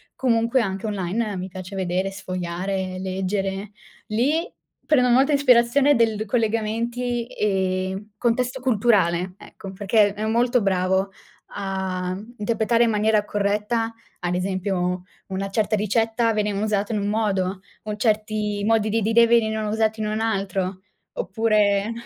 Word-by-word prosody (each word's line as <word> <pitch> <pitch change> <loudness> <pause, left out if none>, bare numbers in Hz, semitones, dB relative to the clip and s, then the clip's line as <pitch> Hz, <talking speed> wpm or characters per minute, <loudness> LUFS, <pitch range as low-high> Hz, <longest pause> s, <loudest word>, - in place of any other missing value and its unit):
comunque 235 0 +2
anche 195 -1 -3
online 205 +1 -2
mi 185 +1 -4
piace 185 +1 -8
vedere, 185 +1 -1
sfogliare, 185 0 -4
leggere. 195 +1 -2 0.4
Lì 290 - 0 0.3
prendo 250 -5 +3
molta 265 +5 +4
ispirazione 280 +1 +4
del 220 -2 +1
collegamenti, 230 +2 -1
ehm, 190 0 -1
contesto 245 +3 0
culturale, 200 -7 +2
ecco, 195 - -10
perché 205 +1 +2
è 215 +1 -3
molto 240 +2 +2
bravo 190 0 +1 0.4
a, 190 -2 -3
mhmm, 220 +5 -11
interpretare 230 +2 +2
in - - +1
maniera 215 0 +2
corretta, 210 +3 -1 0.3
ad 175 -1 -1
esempio, 180 -1 -1 0.2
una 195 +1 -3
certa 215 +1 +1
ricetta 225 +2 +1
venivano 210 -1 0
usate 210 +1 -1
in 210 - 0
un 200 - -2
modo, 195 -3 0 0.2
con 210 -1 -4
certi 210 -2 0
modi 220 -1 +2
di 225 +2 +1
dire 225 +2 +4
venivano 220 -2 +2
usati 220 0 0
in 215 - -1
un 215 +1 -2
altro. 195 -3 -1 0.3
Oppure 215 - +1
210 Hz, 135 wpm, -23 LUFS, 190-230 Hz, 0.4 s, molta